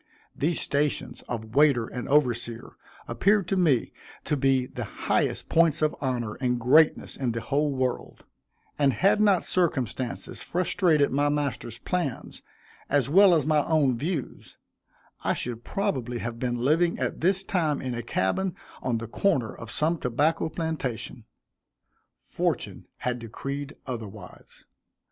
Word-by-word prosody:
These 160 +3 0
stations 145 0 -1
of 110 -2 -5
waiter 140 -4 +4
and 125 +1 -6
overseer 120 -5 +1 0.4
appeared 200 -2 +2
to 195 - +1
me 155 -10 +2 0.3
to 150 - 0
be 135 -2 +2
the - - -6
highest - - -1
points 165 -2 +3
of 155 - +1
honor 120 -5 -1
and 125 -1 +1
greatness 150 +7 +4
in 125 -4 -1
the 115 - -3
whole 145 +3 0
world, 130 -2 -3 0.6
and 140 -2 +4
had 200 +3 +3
not 200 -4 +4
circumstances 130 - -2
frustrated 170 -4 +2
my 145 +2 +2
master's 135 -6 -2
plans, 160 0 -3 0.5
as 140 -2 +2
well 190 +2 +7
as 155 - +1
my 155 -1 +3
own 145 -6 +2
views, 150 +2 -4 0.7
I - - +1
should 120 -1 -4
probably 130 - -2
have 115 0 -5
been 125 -1 -1
living 155 +8 +2
at - - -2
this 190 +3 +2
time 165 -7 0
in 130 -1 -4
a 120 - -3
cabin 120 - -1 0.3
on 120 -3 0
the 115 0 -5
corner 125 - 0
of 115 - -10
some 160 +7 0
tobacco 150 +7 +1
plantation. 140 -8 -4 1.0
Fortune - - -3
had 125 -1 -2
decreed 140 +5 -6
otherwise. 115 -6 -9
140 Hz, 140 wpm, -26 LUFS, 120-160 Hz, 1.0 s, well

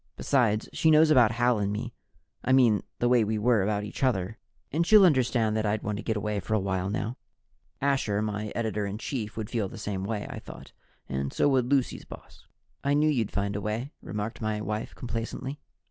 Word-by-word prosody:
Besides, 115 -6 +1
she 160 - +3
knows 155 0 +6
about 120 -6 +5
Hal 120 -1 +2
and 100 0 0
me 115 +3 -4 0.5
I 130 - +2
mean 120 -7 +5 0.2
the 120 - +1
way 120 -2 +4
we 110 +1 -1
are 110 0 +3
about 105 +1 0
each 105 - -7
other 110 -5 0 0.3
and 160 +4 +2
she'll 205 +2 +7
understand 120 -8 +2
that 110 0 0
I'd 105 +1 -1
want 105 -1 -2
to 115 - -6
get 110 -2 -1
away 105 0 -2
for 110 +3 -2
a - - +3
while 95 -1 -1
now." 110 +4 -3 0.7
Asher, 135 -7 +1
my 105 0 -3
editor 110 -3 -1
in 100 +1 -4
chief, 110 -3 -4
would 110 -2 -4
feel 110 -5 -1
the - - -10
same 95 -2 -3
way, 105 +1 -3
I - - -6
thought, - - -11 0.4
and 70 0 -2
so - - +2
would 130 -3 +2
Lucy's 135 -2 0
boss. - - -13 0.4
"I 140 +1 +2
knew 150 +1 +3
you'd 115 -7 0
find 100 0 -2
a 105 - -2
way," 110 +7 -3
remarked 105 +3 -5
my 110 -1 -1
wife 105 0 -4
complacently. 125 +4 -5
110 Hz, 210 wpm, -28 LUFS, 105-125 Hz, 0.7 s, she'll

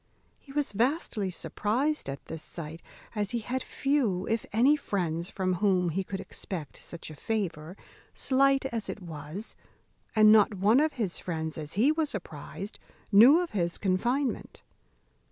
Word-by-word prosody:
He 275 - -15
was 290 0 0
vastly 225 - 0
surprized 240 - -1
at 135 - -6
this 160 - -6
sight, 165 0 -8 0.3
as 205 -3 -1
he 240 - -1
had 255 +4 -2
few 250 -13 0
if 225 0 -1
any 255 +8 +5
friends 175 - -2
from 185 -1 -1
whom 185 -4 +3
he 190 +4 -1
could 190 +1 -5
expect 175 -5 -6
such 170 -2 -8
a - - -9
favour, 180 -4 -3 0.4
slight 275 0 +3
as 235 -5 -3
it - - -4
was; 165 +3 -7 0.6
and 215 -1 +7
not 215 -1 +6
one 205 +7 +4
of 310 +1 +2
his 210 -9 -2
friends, 160 -3 -3
as 150 0 -6
he 245 +9 +4
was 310 -5 0
apprized, 185 +3 -7 0.3
knew 245 - +8
of 350 - -4
his 175 -4 -1
confinement. 235 +7 -1
205 Hz, 155 wpm, -29 LUFS, 175-255 Hz, 0.6 s, knew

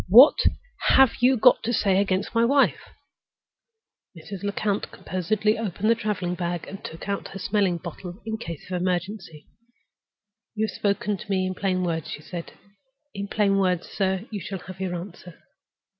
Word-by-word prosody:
What 245 +9 +9 0.6
have 265 -3 +6
you 255 +1 +4
got 240 +3 +6
to 230 - -1
say 195 -4 +2
against 195 +1 -1
my 230 0 +3
wife?" 275 +3 +3 1.4
Mrs. 185 +4 -8
Lecount 205 0 -1
composedly 210 +4 -1
opened 215 0 0
the - - +7
traveling 210 -5 -2
bag 175 -1 -3
and 195 - -9
took 160 - -8
out 200 -1 -2
her 195 - -8
smelling 195 -2 +1
bottle, 175 +3 -8
in 220 0 -3
case 170 -9 -7
of 180 -1 -1
emergency. 180 -3 -3 1.1
"You 220 0 +1
have - - -6
spoken 200 0 0
to - - -11
me 190 -1 +1
in 185 - -2
plain 185 -1 0
words," 165 -3 -2
she 150 - -7
said. 170 0 -7 0.6
"In 200 0 -4
plain 200 -1 +2
words, 180 -2 +1
sir, 190 0 -1
you 210 - -3
shall 195 +3 -5
have 185 0 -10
your 185 -2 -2
answer. 175 -1 -9
195 Hz, 170 wpm, -25 LUFS, 180-210 Hz, 1.4 s, What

